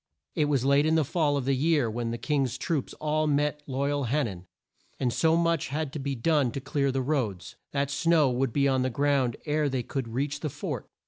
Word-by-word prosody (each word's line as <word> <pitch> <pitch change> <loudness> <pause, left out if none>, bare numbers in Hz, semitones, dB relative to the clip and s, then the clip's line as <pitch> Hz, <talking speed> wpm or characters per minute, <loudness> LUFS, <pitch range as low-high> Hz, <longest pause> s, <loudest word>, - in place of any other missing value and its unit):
It 155 -4 +1
was 140 -4 +1
late 140 +2 +4
in 160 - +3
the 160 -2 +3
fall 150 -1 +1
of 135 - -2
the 135 - +2
year 145 -1 +2
when 115 +1 -3
the 115 - -3
King's 135 -3 -1
troops 160 -7 -2
all 155 0 0
met 150 0 +1
at 145 - -19
Loy 140 +2 0
al 145 -2 -1
Han 140 +4 +1
nan, 95 -5 -7 0.5
and 125 -3 0
so 160 0 +3
much 170 -2 +1
had 150 0 -3
to 150 - -4
be 140 0 -2
done 145 +1 +2
to - - -3
clear 140 0 0
the 130 0 -1
roads, 125 - -2 0.2
that 140 0 -1
snow 155 +1 +3
would 125 0 0
be 140 +3 +2
on 130 -1 +2
the 130 - +1
ground 135 -2 +1
ere 150 -1 +1
they 130 -2 -2
could 130 0 -4
reach 140 +5 -2
the 155 - -3
fort. - - -5
140 Hz, 240 wpm, -27 LUFS, 130-150 Hz, 0.5 s, late